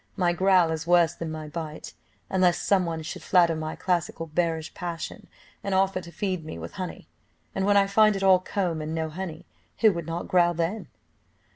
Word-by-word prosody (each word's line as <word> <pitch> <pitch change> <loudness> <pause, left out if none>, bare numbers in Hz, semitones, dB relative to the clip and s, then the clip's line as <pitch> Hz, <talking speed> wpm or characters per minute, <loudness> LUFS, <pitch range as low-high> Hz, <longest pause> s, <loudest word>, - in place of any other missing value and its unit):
My 175 -3 +2
growl 185 -2 +4
is 160 0 -4
worse 170 -2 +4
than 165 -1 -5
my 155 -1 -6
bite, 155 0 -7 0.3
unless 185 -2 +3
some 190 -3 +2
one 165 -1 -3
should - - -6
flatter 170 -3 +4
my 155 0 -4
classical, 170 -2 -1
bearish 160 0 -1
passion, 170 -2 -6 0.4
and 200 -1 -1
offer 190 0 +2
to 170 -1 -11
feed 185 0 -2
me 155 - -7
with 85 0 -7
honey, - - -7 0.5
and 195 - -1
when 205 0 +5
I 200 - +5
find 215 +1 +4
it 195 - -3
all 190 -1 +6
comb 180 -4 -2
and 155 +1 -4
no 160 -1 -2
honey, 175 0 -6 0.4
who 220 -3 +6
would 170 -2 -5
not 165 +1 -4
growl 175 -1 +3
then?" 170 +7 -2
175 Hz, 195 wpm, -26 LUFS, 160-190 Hz, 0.5 s, all